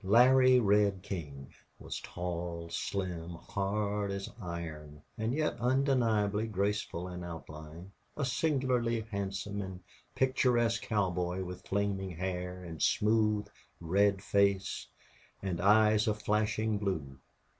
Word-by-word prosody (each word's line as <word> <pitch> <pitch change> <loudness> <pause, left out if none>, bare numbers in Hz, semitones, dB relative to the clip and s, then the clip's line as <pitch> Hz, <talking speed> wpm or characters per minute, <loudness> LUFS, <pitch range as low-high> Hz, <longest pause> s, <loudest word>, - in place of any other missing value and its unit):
Larry 130 +5 +6
Red 100 -3 +3
King 75 -9 -6 0.2
was - - -6
tall, 85 -1 -4
slim, 90 -4 -3
hard 100 +3 -2
as 100 0 -3
iron, 80 -4 -6
and 110 +1 -1
yet 150 +3 0
undeniably 115 -5 +2
graceful 100 -3 -1
in 90 -1 -6
outline 80 +1 -9 0.3
a 140 - 0
singularly 125 -5 +1
handsome 100 -1 -3
and 95 -2 -6 0.4
picturesque 120 -3 +2
cowboy 90 -3 0
with 90 0 -8
flaming 100 -1 -1
hair 90 +1 -4
and 80 -3 -8
smooth, 105 -1 +3 0.3
red 95 +3 +2
face 100 -1 +1 0.6
and 90 -3 -2
eyes 105 +2 +5
of 105 -1 0
flashing 105 0 +1
blue. 80 -10 -3
100 Hz, 115 wpm, -32 LUFS, 90-110 Hz, 0.6 s, Larry